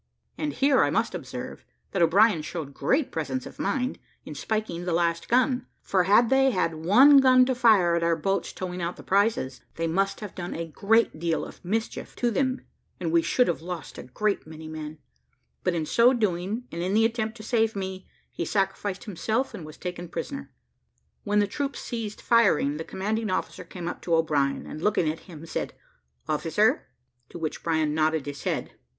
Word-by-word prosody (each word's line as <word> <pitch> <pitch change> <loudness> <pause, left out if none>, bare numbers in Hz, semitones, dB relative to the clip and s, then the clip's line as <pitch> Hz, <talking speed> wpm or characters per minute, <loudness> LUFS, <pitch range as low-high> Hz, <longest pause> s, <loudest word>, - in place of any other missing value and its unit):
And 295 -1 -3
here 275 -1 +3
I - - +2
must - - 0
observe, - - -7 0.3
that 190 - -1
O'Brien 185 +2 +5
showed 150 -3 -6
great 270 - +1
presence 135 -5 -3
of - - -11
mind 250 +6 -1 0.3
in - - -7
spiking 215 -6 -3
the 175 - -1
last 170 0 0
gun; 250 +1 +2 0.2
for 185 -2 +2
had 220 +5 +5
they 270 0 +5
had 180 -7 0
one 215 - +6
gun 255 -1 +6
to 260 - +1
fire 215 -8 +4
at 170 - +1
our 170 0 +2
boats 195 +5 -1
towing 180 -1 -5
out 170 +1 -2
the - - -12
prizes, 195 - +1
they 165 - -2
must 195 +4 0
have 210 -3 -7
done 175 -1 -5
a 165 - -3
great 200 +3 +1
deal 165 -1 -1
of - - -13
mischief 220 +5 -3
to 240 -1 0
them, 260 +3 0 0.4
and - - -2
we 335 0 +4
should 250 -6 +2
have 170 - -1
lost 175 0 -7
a - - -5
great 200 +9 -2
many 160 0 -9
men; 155 0 -7 0.7
but 180 - +1
in 160 -2 -1
so 235 - +5
doing, 210 0 -1
and 170 - -4
in 185 +3 0
the 225 +1 +5
attempt 225 0 -1
to 215 - -10
save 225 -1 +1
me, 190 -1 -5 0.2
he - - -3
sacrificed 195 +1 -1
himself, 220 +5 -2
and 155 - -8
was 155 - -11
taken 180 -1 -6
prisoner. 225 - -5 0.7
When 205 0 +1
the 205 - +4
troops 280 +6 -3
ceased 220 -3 -5
firing, 155 -11 +3
the 160 - -4
commanding 215 +5 -2
officer 185 0 -3
came 170 0 -7
up - - -5
to 170 - +1
O'Brien, 145 -4 +1
and 155 - -8
looking 205 -4 +2
at 155 +1 -2
him, 160 -2 -10
said, 160 - -4 0.5
"Officer?" - - +1 0.4
to - - -9
which 160 -2 -3
O'Brien 160 -2 0
nodded 155 -1 +1
his 145 -1 -6
head. - - -2
190 Hz, 195 wpm, -26 LUFS, 165-225 Hz, 0.7 s, one